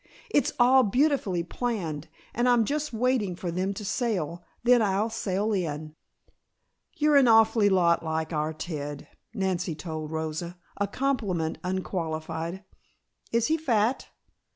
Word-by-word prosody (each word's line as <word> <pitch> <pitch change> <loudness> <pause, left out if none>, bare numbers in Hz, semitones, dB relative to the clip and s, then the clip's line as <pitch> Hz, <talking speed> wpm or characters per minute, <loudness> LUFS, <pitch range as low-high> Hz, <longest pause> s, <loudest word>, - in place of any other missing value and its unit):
It's 290 - +2
all 255 +2 +6
beautifully 245 - +1
planned 170 - -3 0.3
and 240 +2 +2
I'm 240 -2 +4
just 300 +4 -2
waiting 230 -5 0
for 175 -1 -4
them 185 +3 -1
to 210 - -6
sail, 180 - -2 0.2
then 245 0 +5
I'll 205 +2 +1
sail 210 -1 -1
in." 155 -5 -3 1.0
"You're 300 -1 +4
an 270 -3 +6
awful 225 -2 +5
lot 175 -3 +3
like 160 0 -2
our 155 0 0
Ted," 150 -3 -6 0.3
Nancy 185 -5 -1
told 155 -2 -5
Rosa, 160 +2 -4 0.2
a 200 - 0
compliment 200 -10 -1
unqualified. 170 -1 -3 0.7
"Is 230 0 +2
he 320 +4 +2
fat?" 240 -5 +1
190 Hz, 130 wpm, -27 LUFS, 165-235 Hz, 1.0 s, all